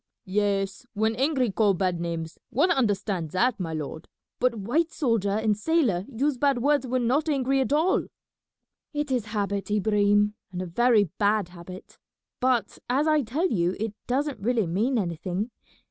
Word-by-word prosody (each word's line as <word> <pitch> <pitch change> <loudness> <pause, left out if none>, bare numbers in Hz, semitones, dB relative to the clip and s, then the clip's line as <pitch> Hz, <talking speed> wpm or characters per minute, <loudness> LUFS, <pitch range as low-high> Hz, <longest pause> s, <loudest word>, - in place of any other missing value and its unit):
"Yes, 195 +3 -1
when 220 +2 +1
angry 265 -3 +1
call 205 -1 +3
bad 180 -2 0
names, 165 -1 -4
one 300 +10 +2
understand 200 - 0
that, 235 +3 +2
my 170 -3 -3
lord; 155 0 -5 0.3
but 250 -2 +2
white 270 - 0
soldier 230 -8 0
and 215 +1 +1
sailor 215 - +1
use 275 +2 0
bad 280 -2 +3
words 280 +2 +2
when 250 0 0
not 290 +7 +1
angry 270 -2 +1
at 265 - -1
all." 320 +6 +2 0.9
"It 295 -1 -2
is 245 -4 0
habit, 205 -2 -2
Ibrahim, 205 0 +2 0.2
and 180 - -5
a 185 - -2
very 225 +5 +3 0.2
bad 205 -3 +2
habit; 180 +1 -11 0.4
but, 250 -5 +1
as 270 +4 +2
I 305 -1 +4
tell 290 +10 -1
you, 180 -2 +1
it 220 -1 -2
doesn't 275 -1 -1
really 225 0 +1
mean 215 +10 0
anything. 185 +3 -2
220 Hz, 160 wpm, -26 LUFS, 195-260 Hz, 0.9 s, I